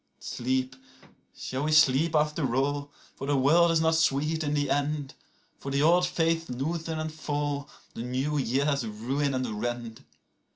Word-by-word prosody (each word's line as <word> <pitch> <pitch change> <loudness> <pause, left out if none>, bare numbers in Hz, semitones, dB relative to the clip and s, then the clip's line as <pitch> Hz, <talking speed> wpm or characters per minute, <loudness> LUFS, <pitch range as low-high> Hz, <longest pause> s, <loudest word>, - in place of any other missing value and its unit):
39Sleep, 130 +1 -2 0.6
shall 130 +2 -4
we 155 - 0
sleep 155 +1 +4
after 150 -4 +1
all? 145 +1 -1 0.2
for 135 - -6
the 145 -1 +2
world 165 +6 +5
is 165 -1 +2
not 160 0 +3
sweet 160 0 +1
in 145 0 -1
the 145 -1 +1
end;40For 145 -1 -4
the 140 +1 +1
old 175 +3 +4
faiths 165 -1 0
loosen 160 +6 -3
and 155 0 -4
fall, 145 -2 -3 0.2
the - - -6
new 130 +5 -1
years 140 +2 +1
ruin 130 +6 -2
and 115 -5 -3
rend. 120 -2 -4
145 Hz, 155 wpm, -28 LUFS, 130-155 Hz, 0.6 s, world